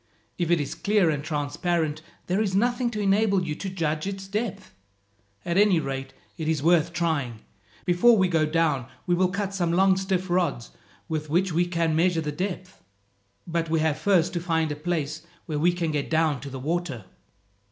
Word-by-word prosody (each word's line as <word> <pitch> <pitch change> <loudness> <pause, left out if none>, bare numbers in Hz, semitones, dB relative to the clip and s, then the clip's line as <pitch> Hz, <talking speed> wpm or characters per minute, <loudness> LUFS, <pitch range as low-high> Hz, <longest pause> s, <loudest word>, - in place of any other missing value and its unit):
If 170 -2 0
it 175 -1 +4
is 145 - -3
clear 200 -5 +2
and 145 -1 -3
transparent, 155 +1 -1 0.2
there 185 +4 0
is 195 -3 0
nothing 240 +3 +1
to 215 -3 -5
enable 200 -1 +2
you 155 -3 -2
to 190 +5 -5
judge 160 -2 -2
its 195 -1 -5
depth. 210 +1 -4 0.7
At 170 +3 +1
any 205 -5 +5
rate 135 -2 -4 0.3
it 160 - -3
is 155 -3 0
worth 170 -1 +4
trying. 155 -9 -1 0.4
Before 200 +7 +5
we 190 -2 +3
go 160 -3 +2
down, 155 -6 +1 0.2
we 175 - +1
will 180 +1 +3
cut 200 +1 -3
some 175 -3 0
long 190 +2 +4
stiff 190 -1 -1
rods 175 -9 0 0.4
with 155 -2 -3
which 180 +3 +1
we 175 +2 +2
can 165 -2 0
measure 170 0 +2
the 150 -1 -3
depth. 185 +3 -5 0.6
But 165 -1 -2
we 160 0 +2
have 155 -2 +1
first 185 -4 +2
to 175 - -1
find 160 -3 0
a - - -2
place 155 -1 -2 0.2
where 150 -3 -3
we 175 +4 +4
can 170 -2 -2
get 145 -2 -2
down 160 -3 +2
to 140 - -7
the 135 - -6
water." 150 - -3
170 Hz, 195 wpm, -25 LUFS, 155-185 Hz, 0.7 s, any